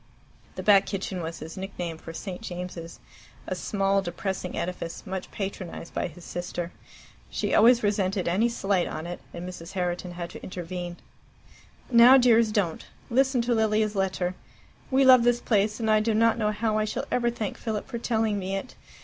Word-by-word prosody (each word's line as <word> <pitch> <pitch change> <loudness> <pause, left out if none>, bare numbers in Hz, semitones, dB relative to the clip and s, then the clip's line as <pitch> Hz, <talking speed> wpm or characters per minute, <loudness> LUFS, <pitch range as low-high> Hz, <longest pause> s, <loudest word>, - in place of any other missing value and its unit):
The - - -5
Back 200 -2 +6
Kitchen 190 -2 -3
was 165 0 -5
his 160 - -9
nickname 175 -4 -5
for 165 - -8
St. 180 +3 -6
James's, 180 -4 -7 0.5
a - - -3
small 195 -1 +1
depressing 185 +1 -4
edifice 170 -1 -4
much 190 -1 -5
patronized 190 -4 -6
by - - -1
his 175 +1 -13
sister. 175 0 -4 0.6
She - - -2
always 235 +2 +6
resented 195 -2 0
any 200 +8 +2
slight 195 -5 0
on 155 - -5
it, 175 +1 -5
and 175 +1 -6
Mrs. 180 0 -8
Herriton 180 -1 -2
had 175 -1 -6
to - - -9
intervene. 175 -1 -6 0.9
"Now, 240 +2 +9
dears, 230 -3 +5
don't. 190 -6 0 0.3
Listen 260 0 +3
to 240 +1 +1
Lilia's 215 -1 +2
letter. 190 -2 0 0.6
'We 270 0 +4
love 255 -2 +8
this 240 0 +3
place, 210 -1 +1
and 225 - -1
I 215 0 +5
do 215 0 +1
not 230 +1 +4
know 215 -2 0
how 215 0 0
I 215 - +1
shall 215 - -3
ever 240 -1 +2
thank 225 -4 -4
Philip 215 -2 -3
for 240 -3 -5
telling 220 -3 0
me 190 0 -3
it. 195 +6 -5
195 Hz, 180 wpm, -27 LUFS, 180-225 Hz, 0.9 s, Now